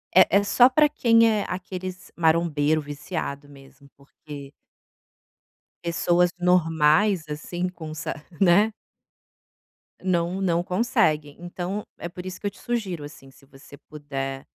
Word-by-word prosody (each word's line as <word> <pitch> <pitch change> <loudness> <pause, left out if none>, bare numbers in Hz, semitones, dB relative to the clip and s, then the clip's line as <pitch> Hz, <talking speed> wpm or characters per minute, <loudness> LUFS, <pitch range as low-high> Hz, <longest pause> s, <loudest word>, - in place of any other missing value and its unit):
é 185 +1 +6
é 200 - +2
só 245 +5 +5
pra 300 +3 +4
quem 230 -5 +4
é 210 -2 0
aqueles 185 0 -6
marombeiro 160 -2 +2
viciado 145 -1 -6
mesmo 140 0 -17
porque 140 0 -11 1.3
pessoas 175 +1 +2
normais, 165 0 +3
assim, 175 +4 -4
com 160 -4 -8
sa - - -4 0.3
né. 200 +4 +4 1.3
Não 180 0 0
não 175 -2 +1
conseguem, 180 - +1
então 180 +3 -4 0.2
é 170 - -5
por 180 +1 -9
isso 185 - -7
que 205 - -5
eu - - 0
te 200 - -20
sugiro, 195 -10 -3
assim, 135 -2 -12
se 135 +1 -21
você 140 +1 -15
puder 135 -3 -5
175 Hz, 130 wpm, -24 LUFS, 150-190 Hz, 1.3 s, é